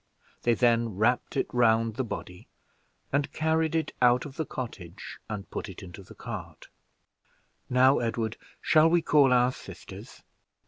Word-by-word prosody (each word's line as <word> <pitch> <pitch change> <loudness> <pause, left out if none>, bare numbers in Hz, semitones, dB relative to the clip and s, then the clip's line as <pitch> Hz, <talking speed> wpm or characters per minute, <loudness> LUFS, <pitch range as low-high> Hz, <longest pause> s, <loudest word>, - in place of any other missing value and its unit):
They 120 -1 +2
then 115 -1 +2
wrapped 120 +7 +1
it - - +2
round 115 -2 +3
the 130 - -1
body, 90 -6 -7 0.7
and 140 0 0
carried 160 0 0
it 160 - -1
out 125 +1 +4
of 140 -2 -9
the 160 -3 -3
cottage, 100 -8 -7
and 105 -2 -5
put - - -5
it 95 - -10
into 95 +1 -10
the 95 - -15
cart. - - -8 1.0
"Now, 130 +2 +5
Edward, 115 -1 -2 0.3
shall 155 +1 +5
we 170 0 +2
call 145 -4 +4
our 125 0 +4
sisters?" - - -11
125 Hz, 150 wpm, -28 LUFS, 110-140 Hz, 1.0 s, Now